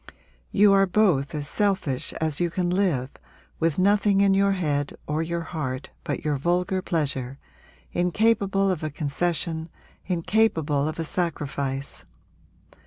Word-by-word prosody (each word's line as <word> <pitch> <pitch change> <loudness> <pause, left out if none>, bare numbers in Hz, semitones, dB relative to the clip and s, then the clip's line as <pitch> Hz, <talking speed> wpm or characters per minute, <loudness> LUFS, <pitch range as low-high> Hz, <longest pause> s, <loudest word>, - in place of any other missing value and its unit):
You 205 -1 +5
are 195 0 +5
both 175 -8 +2
as 145 -1 -3
selfish 190 -9 0
as 155 -2 -2
you 175 -1 +1
can 175 +1 -1
live, 170 -9 +1 0.5
with 165 -2 +1
nothing 200 +1 +3
in 200 -1 +4
your 195 0 +3
head 145 -6 -1
or 150 +2 -1
your 170 +1 -2
heart 150 -6 -4
but - - -4
your 150 -2 +1
vulgar 180 +5 0
pleasure, 140 -7 -2 0.5
incapable 195 +1 +2
of 180 - -2
a 155 - -2
concession, 160 +2 -2 0.4
incapable 170 -5 +1
of 155 - -4
a 165 - -2
sacrifice!' 140 -5 -3
170 Hz, 135 wpm, -25 LUFS, 145-195 Hz, 0.5 s, You